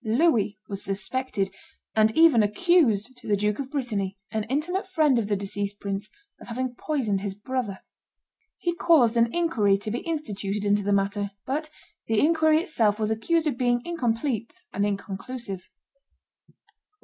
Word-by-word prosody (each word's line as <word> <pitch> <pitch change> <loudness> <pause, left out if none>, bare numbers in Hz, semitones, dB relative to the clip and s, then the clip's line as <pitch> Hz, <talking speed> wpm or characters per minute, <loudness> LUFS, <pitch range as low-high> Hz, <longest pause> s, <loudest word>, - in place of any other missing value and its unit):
Louis 225 -3 +2
was 200 -1 -5
suspected, 200 0 -2 0.4
and 215 0 +5
even 320 -8 +7
accused 250 - +2
to - - -12
the 205 -1 +2
Duke 210 +3 0
of 270 -1 -4
Brittany, 210 -9 -2
an 220 -2 -1
intimate 325 - -1
friend 310 -9 +3
of 215 - -2
the 205 - +1
deceased 200 +1 -3
prince, 200 +1 -4 0.3
of - - -13
having 250 +1 -3
poisoned 240 -8 -1
his 200 -1 -4
brother. 215 -2 -3 0.8
He 345 - -1
caused 310 -9 +4
an 230 0 +3
inquiry 235 -13 +2
to 210 +2 -4
be 240 - -1
instituted 210 -11 -3
into 205 0 +3
the 205 0 -1
matter; 200 +1 +1 0.2
but 300 +4 -2 0.4
the 225 -1 +2
inquiry 315 +1 +4
itself 220 - +2
was 215 -1 -1
accused 320 +10 +1
of 275 -5 -1
being 245 -1 +2
incomplete 240 - -1 0.2
and 200 +1 +1
inconclusive. 200 0 -5
225 Hz, 155 wpm, -26 LUFS, 205-285 Hz, 0.8 s, even